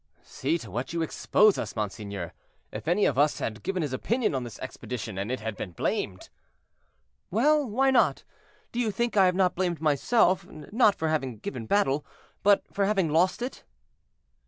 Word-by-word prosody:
"See 150 +6 -1
to 115 - -10
what 125 - -4
you 165 -1 0
exposed 210 +5 +3
us, - - -4
monseigneur, 100 -4 -4 0.4
if - - -7
any 180 +5 +3
of - - +1
us 145 +1 +3
had 110 -1 -4
given 185 - -2
his 145 -3 -3
opinion 230 - 0
on 130 -2 -1
this 120 -2 -8
expedition, 125 -5 -6
and 100 +5 -3
it 130 - -3
had 110 -1 -4
been 90 -2 -6
blamed." 95 +3 -2 1.0
"Well, 295 - +3
why 265 +5 +3
not? 265 - +3 0.5
do 240 - -3
you 235 -3 +1
think 235 +1 -1
I 195 -2 +6
have 180 - +1
not 185 -1 +3
blamed 175 -3 -1
myself, 175 - +3
not 205 - +2
for 160 - -1
having 135 -7 -1
given 115 +1 -6
battle, 145 - +2 0.4
but 200 0 +4
for 200 0 +1
having 195 -6 +1
lost 180 +8 +2
it." 255 - -6
160 Hz, 180 wpm, -27 LUFS, 125-205 Hz, 1.0 s, I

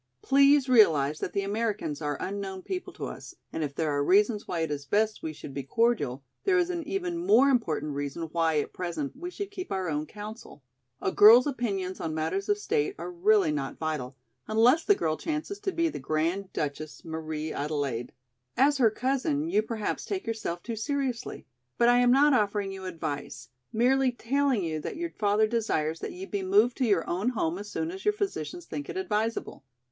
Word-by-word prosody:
Please 275 0 +5
realize 155 - +4
that - - -3
the 200 - -1
Americans 200 -7 -2
are 145 -2 -2
unknown 195 -1 -4
people 370 -1 -4
to - - -6
us - - -8 0.2
and 160 - -2
if 140 -1 -4
there 155 -2 0
are 145 0 +1
reasons 205 +5 +3
why 170 -2 -2
it 160 -2 -1
is 145 -1 -3
best 215 +7 0
we 160 - -3
should 145 -2 -10
be 140 - -3
cordial, 140 - 0 0.2
there 390 -1 +3
is 350 0 +2
an 345 -1 -3
even 350 -2 -2
more 270 -2 +5
important 165 - 0
reason 145 +3 -4
why, 165 -2 +1
at - - -4
present, 185 - -4
we 350 +6 -6
should 405 +2 -6
keep 370 - -7
our 190 -2 -1
own 150 -1 -2
council. 210 - -10 0.4
A 190 - +1
girl's 225 +6 +8
opinions 200 -9 -2
on 160 -1 -3
matters 390 - -2
of 410 - +3
state 425 -1 -1
are 370 - -6
really 380 -1 +3
not 300 - -3
vital, 145 -5 -3 0.3
unless 240 +9 +4
the 410 - +4
girl 155 - -1
chances 320 +6 -4
to 410 -1 -2
be 335 -2 +1
the 320 - -4
Grand 170 +5 -1
Duchess 150 +1 -4
Marie 160 -1 -4
Adelaide. 140 -5 -2 0.5
As 280 +1 +4
her 235 -4 +6
cousin 275 +6 -1
you 210 - +4
perhaps 220 -1 -3
take 390 -2 -4
yourself 215 -6 -3
too 230 - -4
seriously. 255 0 -3 0.3
But 235 - +5
I 245 0 +5
am 245 0 +4
not 280 +3 +5
offering 205 -4 +1
you 190 -1 -7
advice, 145 -7 -5 0.2
merely 255 +3 +3
telling 260 -2 0
you 160 -2 -2
that 150 - -5
your 340 0 -3
father 210 +1 +2
desires 190 -9 -1
that - - -5
you 185 +2 -7
be 200 0 -3
moved 205 +6 +3
to 260 - +1
your 195 -6 +2
own 190 +7 0
home 180 -7 -1
as 205 0 -7
soon 320 +8 -3
as 385 +1 -8
your 420 0 +2
physicians 385 -4 -4
think 290 - -6
it - - -5
advisable. 230 - -2
215 Hz, 200 wpm, -28 LUFS, -, 0.5 s, girl's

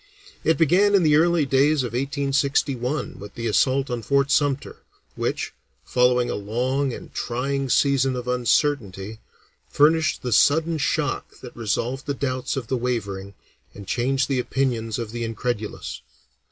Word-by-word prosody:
It 160 - +2
began 185 +6 +4
in 190 - +4
the 150 -2 +4
early 165 0 +3
days 140 +2 +3
of 120 -2 -5
1861 140 0 -1
with 100 0 -10
the 115 - -5
assault 130 +4 +2
on 120 -1 -2
Fort 140 +5 +1
Sumter, 145 -2 +1 0.4
which, - - -2 0.3
following 125 0 +3
a - - -2
long 125 +7 -1
and - - -9
trying 135 +3 -2
season 135 -1 +2
of 125 0 -5
uncertainty, 115 -5 0 0.5
furnished 160 +2 +3
the 125 - -2
sudden 160 +7 +3
shock 145 -1 -2
that 125 - -10
resolved 120 +4 -2
the 140 - -1
doubts 130 -1 -2
of 130 - -3
the 130 +3 -1
wavering 100 -5 -3 0.4
and 100 - -9
changed 130 +3 0
the 135 -2 0
opinions 120 -4 -1
of 115 -3 -5
the 120 0 -4
incredulous. 115 -1 -4
130 Hz, 150 wpm, -23 LUFS, 120-140 Hz, 0.5 s, began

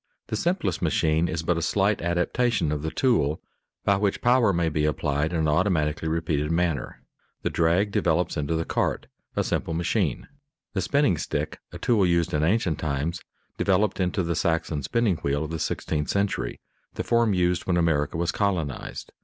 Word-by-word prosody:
The - - -1
simplest 170 - -1
machine 80 0 +2
is 80 -1 -3
but 85 0 +1
a - - -4
slight 100 +4 +1
adaptation 90 +2 +1
of 75 -1 -2
the 80 - -2
tool, 80 - +1 0.5
by 100 -1 +4
which 100 -1 0
power 120 -3 +4
may 85 -2 +1
be 75 -1 0
applied 75 +1 0
in 85 - -1
an 80 - +1
automatically 80 -2 +1
repeated 80 -2 0
manner. 85 -5 -1 0.4
The - - 0
drag 85 +5 +2
develops 90 -1 +1
into 75 +1 -1
the 80 0 -1
cart, - - -1 0.3
a - - +1
simple 80 - -2
machine. 85 - 0 0.5
The 95 - 0
spinning 105 - +2
stick, 75 +1 -3
a - - -7
tool 115 -5 +2
used 85 0 +1
in 75 - +1
ancient 90 -3 +1
times, 80 +3 -2 0.4
developed 100 +1 +2
into 90 +1 0
the 85 0 -1
Saxon 80 -2 0
spinning 100 - +1
wheel 70 0 -1
of 80 - -5
the 80 - -3
sixteenth 75 -1 -2
century, 100 -12 -1 0.4
the - - -2
form 115 -4 +2
used 90 -1 +1
when 90 -2 +2
America 80 -3 +1
was 85 0 0
colonized. 90 -9 -2
85 Hz, 180 wpm, -25 LUFS, 80-95 Hz, 0.5 s, by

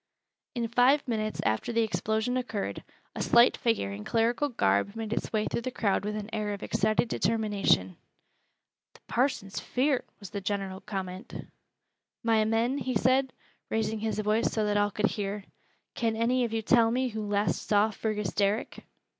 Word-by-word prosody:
In 235 -1 -1
five 255 +5 +3
minutes 215 -2 -2
after 110 - 0
the 230 0 +2
explosion 220 +2 -1
occurred, 245 -5 -3 0.3
a - - -5
slight 235 +1 +5
figure 225 - 0
in 100 +1 -6
clerical 235 - +1
garb 100 - +1
made 225 -1 -3
its - - -3
way 215 -1 +1
through - - -2
the 255 - -3
crowd 205 -6 0
with 210 0 -2
an 210 -1 -4
air 210 -2 -1
of 200 - -10
excited 215 +1 +1
determination. 205 - +1 1.0
"Th' - - -21
parson's 240 -6 -1
feart," 265 +1 0
was 200 - -10
the 200 -2 -4
general 195 -1 -3
comment. 190 +1 -6 0.8
"My 225 -1 +3
men," 230 +5 +1
he 255 -2 -2
said, 260 +4 +3 0.4
raising 220 0 -1
his 220 0 -2
voice 215 +2 +1
so 215 -1 0
that 210 0 0
all 205 0 +3
could 210 +1 -1
hear, 205 -1 -2 0.5
"can 225 -1 0
any 245 +2 +2
of 230 - -4
you 225 0 -1
tell 230 0 +4
me 255 +2 0
who 220 -1 -4
last 205 0 0
saw 210 +1 +3
Fergus 210 -2 -2
Derrick?" 205 +3 0
220 Hz, 170 wpm, -28 LUFS, 205-235 Hz, 1.0 s, slight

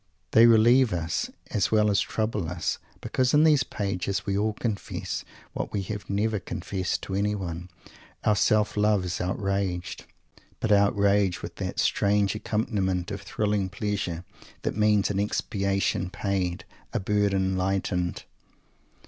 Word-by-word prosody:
They 115 +1 +7
relieve 115 +1 +5
us, 85 -1 -1 0.2
as 100 -3 +1
well 105 -1 +4
as 100 - +3
trouble 110 -6 -2
us, 90 -2 -2 0.2
because 130 +2 +1
in 150 - +6
these 150 -3 +5
pages 100 -4 -2
we 100 - 0
all 105 +2 +1
confess 105 -1 -3 0.3
what - - -4
we 100 - -2
have 105 +2 -6
never 105 +2 0
confessed 95 +1 -3
to 95 - -5
anyone. 95 -4 -2 0.5
Our 105 - +3
self 105 +2 +2
love 105 -2 +2
is 85 -1 -3
outraged, 95 -1 -2 0.5
but 110 - -1
outraged 100 -2 +3
with - - -7
that - - -3
strange 100 0 +2
accompaniment 105 -4 -1
of 100 -1 -4
thrilling 105 -1 -1
pleasure 95 -3 -3 0.4
that - - -1
means 105 -1 +3
an 100 - -1
expiation 100 -2 0
paid, 95 -3 -2 0.3
a - - +1
burden 95 -1 +1
lightened. 90 -2 -1
100 Hz, 140 wpm, -26 LUFS, 95-105 Hz, 0.5 s, They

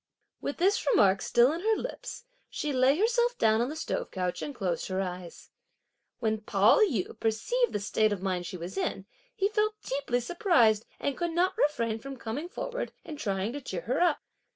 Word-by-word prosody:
With 285 - -3
this 390 +4 +2
remark 195 - +4
still 240 +3 +4
on 325 - -3
her 440 +4 +2
lips, 485 +1 -6 0.2
she 295 -1 -3
lay 260 +3 +4
herself 480 +4 +2
down 220 +1 +3
on 245 - 0
the 305 - -5
stove 315 - -3
couch 180 -2 -3
and 290 - -5
closed 180 -6 -2
her 185 0 -2
eyes. 180 -2 -6 0.7
When 220 -2 -1
Pao 205 0 +4
yü 240 - +1
perceived 425 - +1
the - - -1
state 215 +1 +1
of 205 - -1
mind 180 -2 -1
she 185 - -6
was 175 - -5
in, 375 - -2 0.3
he 395 -4 +2
felt 425 0 0
deeply 265 -2 -1
surprised 245 - +3
and 280 - -1
could 345 -1 -2
not 360 +2 +2
refrain 230 -7 +1
from 270 +3 -8
coming 260 +9 -5
forward - - -4
and 300 -2 -7
trying 200 -1 -1
to 290 - -5
cheer 190 -9 -5
her 245 - -1
up. 345 -4 +2
255 Hz, 195 wpm, -29 LUFS, -, 0.7 s, remark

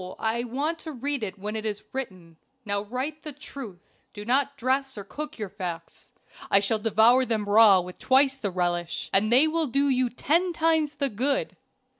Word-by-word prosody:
I 230 +2 -1
want 290 +7 -2
to 315 -1 -7
read 280 +1 -2
it 205 -2 -5
when 210 +2 -5
it 220 - -3
is 210 -2 -4
written. 185 -11 -7 0.3
Now 200 -1 -1
write 260 +8 -4
the 305 - -5
truth 260 -9 -11 0.2
do 205 0 -7
not 280 +3 +1
dress 265 0 -1
or 205 - -5
cook 300 +9 -7
your 215 -3 -4
facts. 180 -4 -7 0.4
I 195 - +5
shall 210 +2 0
devour 225 +4 +4
them 225 -4 -1
raw 205 -1 +7
with 180 +1 -10
twice 265 +1 +4
the 250 -7 -4
relish, 175 -2 -2
and 215 +3 +2
they 265 +6 +6
will 320 0 0
do 275 +3 +1
you 255 -1 +2
ten 340 +9 0
times 320 -2 +1
the 280 -1 -1
good. 260 +6 -1
240 Hz, 190 wpm, -26 LUFS, 205-280 Hz, 0.4 s, raw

